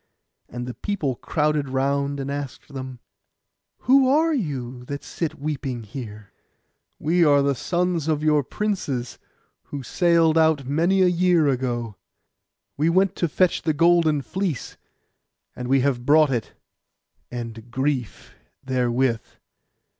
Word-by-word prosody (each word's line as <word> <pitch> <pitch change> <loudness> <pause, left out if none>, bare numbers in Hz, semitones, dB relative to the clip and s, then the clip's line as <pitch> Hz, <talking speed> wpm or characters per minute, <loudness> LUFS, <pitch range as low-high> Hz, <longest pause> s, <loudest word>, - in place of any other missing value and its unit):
And 120 0 -5
the 125 - -5
people 170 - -2
crowded 150 0 -1
round, 140 +1 0
and 135 +1 -4
asked 140 0 -6
them 130 -2 -7 0.8
'Who 265 +2 +5
are 315 +4 +3
you, 130 - -3
that 140 +2 -6
you - - -12
sit 165 -3 -3
weeping 135 -5 -3
here?' 105 -2 -9 0.6
'We 170 +3 +2
are 145 -3 +5
the 140 0 +2
sons 175 +2 -1
of 155 -1 0
your 150 -2 +3
princes, 145 - -3 0.5
who 140 -2 -6
sailed 165 +1 +3
out 160 -4 +3
many 170 +8 +2
a - - +5
year 175 -3 +3
ago. 120 -5 -2 0.8
We 155 +3 +2
went 190 +2 +2
to 170 - 0
fetch 180 +3 +2
the 160 - 0
golden 160 -2 +3
fleece, 185 - -3 0.8
and 125 -1 -5
we 135 +1 +3
have 125 -3 0
brought 150 +1 +5
it, 120 -4 -2 0.8
and 115 -1 -7
grief 130 -1 -3 0.3
therewith. 125 -2 +1
145 Hz, 135 wpm, -23 LUFS, 130-170 Hz, 0.8 s, Who